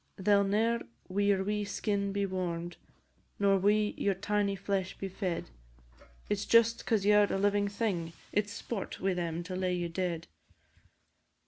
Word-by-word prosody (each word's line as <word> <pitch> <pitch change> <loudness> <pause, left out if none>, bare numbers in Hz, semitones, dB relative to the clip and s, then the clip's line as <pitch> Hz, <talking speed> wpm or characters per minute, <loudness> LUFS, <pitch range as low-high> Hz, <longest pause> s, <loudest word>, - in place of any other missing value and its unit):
They 205 +2 +2
'll 200 0 +5
ne'er 220 +4 +1 0.3
wi' 195 +2 0
your 195 -1 +3
wee 210 +1 -1
skin 200 -1 -1
be 200 0 0
warm'd, 175 -2 -3 0.6
Nor 200 -1 +3
wi' 210 +2 +3
your 200 -1 +1
tiny 200 +1 0
flesh 195 -1 -2
be 195 - -4
fed, 185 - -3 0.8
But 205 0 -1
just 230 0 +5
'cause 215 -4 +2
you 210 - +6
're 210 -1 +5
a - - +1
living 205 +1 +2
thing, 200 -6 -2 0.2
It 205 0 +1
's - - -7
sport 210 -6 -5
wi' 190 0 +1
them 170 -1 -2
to 185 +1 -5
lay 185 -1 0
you 175 -1 -2
dead. 170 -1 -2
200 Hz, 170 wpm, -31 LUFS, 185-205 Hz, 0.8 s, you